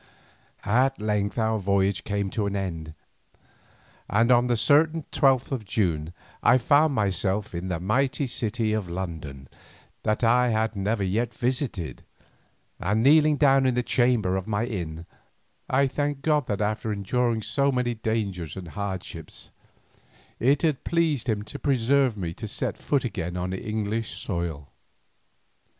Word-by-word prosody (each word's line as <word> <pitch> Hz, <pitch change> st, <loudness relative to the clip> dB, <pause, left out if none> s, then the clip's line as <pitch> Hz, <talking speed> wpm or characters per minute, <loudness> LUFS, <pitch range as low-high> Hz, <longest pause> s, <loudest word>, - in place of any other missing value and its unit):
At 130 Hz, +5 st, +2 dB
length 105 Hz, 0 st, -1 dB
our 110 Hz, -1 st, +1 dB
voyage 100 Hz, 0 st, +1 dB
came 100 Hz, -2 st, -2 dB
to 105 Hz, -3 st, -1 dB
an 100 Hz, -, -3 dB
end, 85 Hz, -5 st, -4 dB, 1.1 s
and 115 Hz, +4 st, +3 dB
on 125 Hz, 0 st, +4 dB
a 120 Hz, -, +2 dB
certain 155 Hz, +6 st, +3 dB
twelfth 135 Hz, -3 st, +2 dB
of 130 Hz, -5 st, -2 dB
June 85 Hz, -7 st, -1 dB, 0.3 s
I 125 Hz, -, +5 dB
found 145 Hz, +4 st, +3 dB
myself 100 Hz, -1 st, -1 dB
in 85 Hz, +2 st, -4 dB
the 90 Hz, -3 st, -2 dB
mighty 135 Hz, -, 0 dB
city 115 Hz, -2 st, -1 dB
of 105 Hz, -5 st, -2 dB
London 80 Hz, -7 st, -6 dB, 0.5 s
that 110 Hz, +2 st, -1 dB
I 125 Hz, +2 st, +4 dB
had 110 Hz, 0 st, 0 dB
never 100 Hz, +2 st, -1 dB
yet 110 Hz, +5 st, -1 dB
visited, 120 Hz, -, -2 dB, 0.8 s
and 105 Hz, +5 st, +1 dB
kneeling 150 Hz, +2 st, +5 dB
down 135 Hz, -2 st, +4 dB
in 125 Hz, -, +1 dB
the 125 Hz, -, +1 dB
chamber 120 Hz, -8 st, +2 dB
of 95 Hz, -, -5 dB
my 110 Hz, +1 st, 0 dB
inn, 85 Hz, -8 st, -5 dB, 0.6 s
I 140 Hz, +2 st, +3 dB
thanked 145 Hz, +1 st, -2 dB
God 150 Hz, -4 st, +2 dB
that 105 Hz, 0 st, -2 dB
after 110 Hz, +1 st, -1 dB
enduring 115 Hz, +3 st, 0 dB
so 140 Hz, +4 st, +1 dB
many 125 Hz, -2 st, 0 dB
dangers 100 Hz, -8 st, -3 dB
and 90 Hz, -3 st, -7 dB
hardships, 100 Hz, 0 st, -6 dB, 0.9 s
it 135 Hz, +4 st, +2 dB
had 155 Hz, -5 st, +1 dB
pleased 155 Hz, -7 st, 0 dB
Him 105 Hz, -2 st, 0 dB
to 105 Hz, -, -8 dB
preserve 130 Hz, -2 st, +2 dB
me 85 Hz, -4 st, -3 dB
to 110 Hz, +5 st, -7 dB
set 105 Hz, -, -2 dB
foot 140 Hz, -3 st, -1 dB
again 90 Hz, -6 st, -3 dB
on 90 Hz, +1 st, -3 dB
English 110 Hz, +2 st, -3 dB
soil. 85 Hz, -6 st, -4 dB
110 Hz, 150 wpm, -26 LUFS, 95-130 Hz, 1.1 s, I